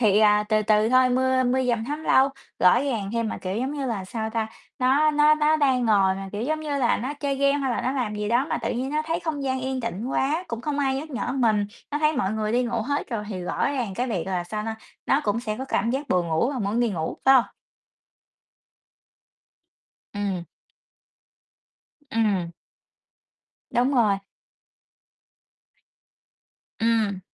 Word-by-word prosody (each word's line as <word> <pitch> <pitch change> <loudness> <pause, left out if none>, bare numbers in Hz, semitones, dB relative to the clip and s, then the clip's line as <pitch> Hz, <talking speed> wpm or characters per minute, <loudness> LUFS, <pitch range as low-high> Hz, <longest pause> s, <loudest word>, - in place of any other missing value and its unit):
Thì, 210 -3 +4
à, 210 -1 +4
từ 215 -1 +2
từ 215 +1 +3
thôi 255 +1 +5
mưa 260 +1 +2
mưa 255 +1 +2
dầm 235 -2 0
thấm 295 +5 -4
lâu, 265 +1 +5 0.3
rõ 180 - +5
ràng 230 -8 -2
thêm. 230 -1 0
Mà, - - -4
kiểu, 185 +2 -4
giống 260 +4 -2
như 280 -2 -3
là, 215 -6 -3
sao 220 +3 -4
ta, 220 -1 -1 0.3
nó 275 +4 +3
nó 300 0 +5
nó 305 +1 +3
đang 260 -4 +2
ngồi 195 -3 +4
mà, 195 0 -6
kiểu, 205 +1 -3
giống 310 +5 -1
như 295 -2 -2
là, 245 - +2
nó 260 +6 -4
chơi 280 -1 -2
game 280 +1 +2
hay 270 -2 -1
là - - -1
nó 255 - -1
làm 245 -6 -2
gì 210 0 -3
đó 245 +4 +2
mà - - 0
tự - - -2
nhiên 260 +3 -3
nó 305 +1 +1
thấy 330 +1 -1
không 305 -4 -3
gian 260 -1 -1
yên 260 0 -2
tĩnh 230 -1 -4
quá, 300 +6 0
cũng 230 -1 -4
không 290 +3 -3
ai 270 -2 +1
nhắc 295 +4 -5
nhở 250 -2 -3
mình. 220 -6 +2 0.2
Nó 295 - -1
thấy 305 0 +2
mọi 210 -6 0
người 215 0 -1
đi 250 +1 +2
ngủ 235 -2 -1
hết 285 +5 -2
rồi 215 -3 -3
thì 185 -4 -5
rõ 180 - -1
ràng 240 -8 -3
cái 250 +6 -1
việc 185 -7 -2
là, 180 -2 -2
sao 210 +4 -4
na, 220 0 -4 0.3
nó 275 - +3
cũng 210 +2 0
sẽ 215 -3 -3
có 265 - -3
cảm 235 -3 0
giác 275 +3 -3
buồn 180 -2 +1
ngủ 165 +11 +1
vào 265 -4 -3
muốn 205 +3 0
đi 240 -2 +2
ngủ, 160 -4 -3
phải 270 0 +7
hông? 250 - +6 2.7
Ừm. 195 -4 -2 1.7
Ừm. 205 -8 +1 1.2
Đúng 250 +4 +2
rồi. 215 -5 +3 2.6
Ừm. 220 -4 +1
240 Hz, 200 wpm, -24 LUFS, 210-270 Hz, 2.7 s, phải